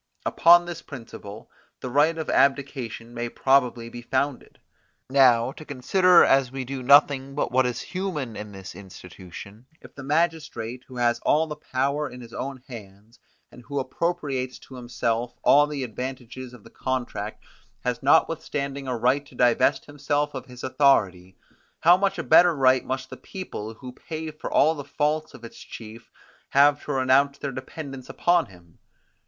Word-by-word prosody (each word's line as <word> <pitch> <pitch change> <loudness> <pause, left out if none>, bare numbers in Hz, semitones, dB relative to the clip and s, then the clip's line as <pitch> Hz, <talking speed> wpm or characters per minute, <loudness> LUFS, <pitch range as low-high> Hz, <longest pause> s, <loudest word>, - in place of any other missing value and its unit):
Upon 175 +1 +6
this 175 -1 -7
principle, 115 -5 -10 0.3
the 130 - -6
right 150 +5 +3
of 160 - -4
abdication 130 -4 0
may 120 0 -4
probably 125 -3 +1
be 120 +1 -9
founded. 130 +2 -3 0.5
Now, 125 -3 +5
to 155 - -11
consider 175 +6 +4
as 135 -2 +3
we 135 -1 -5
do 135 +1 -5
nothing 135 0 +4
but 145 - -1
what 130 +1 +3
is 125 - -3
human 170 - -4
in 105 -1 -7
this 95 -1 -9
institution, 95 +3 -12
if - - -15
the 140 - -10
magistrate, 145 -5 -2
who 130 - -11
has 120 -1 +1
all 155 +6 +2
the 150 -1 -6
power 140 +1 -2
in 125 - -11
his 115 -2 -12
own 135 -1 -6
hands, 110 -1 -12 0.3
and 125 - -14
who 140 +4 -7
appropriates 135 -2 -2
to - - -15
himself 120 -1 -3
all 145 +1 +6
the 145 -3 -4
advantages 125 +1 -7
of 115 - -17
the - - -16
contract, 130 -2 -4 0.4
has - - -2
notwithstanding 140 -1 +1
a 125 -2 -2
right 130 +5 +2
to 130 - -17
divest 120 -1 +2
himself 145 0 -2
of 130 -1 -7
his 125 0 -12
authority; 95 -10 +2 0.4
how 175 +2 +7
much 195 0 0
a 165 - -3
better 175 +1 +6
right 130 -2 +3
must 130 0 -4
the - - -8
people, 115 - -7
who 125 +2 -9
pay 160 +3 -6
for 155 - -8
all 160 - +4
the 145 -3 -7
faults 150 +2 -2
of 120 - -14
its 115 - -12
chief, 115 +1 -11 0.4
have 145 +1 +4
to - - -5
renounce 135 +2 +3
their 140 - -4
dependence 135 0 -8
upon 175 -1 +2
him. 85 -3 -19
130 Hz, 170 wpm, -25 LUFS, 120-145 Hz, 0.5 s, how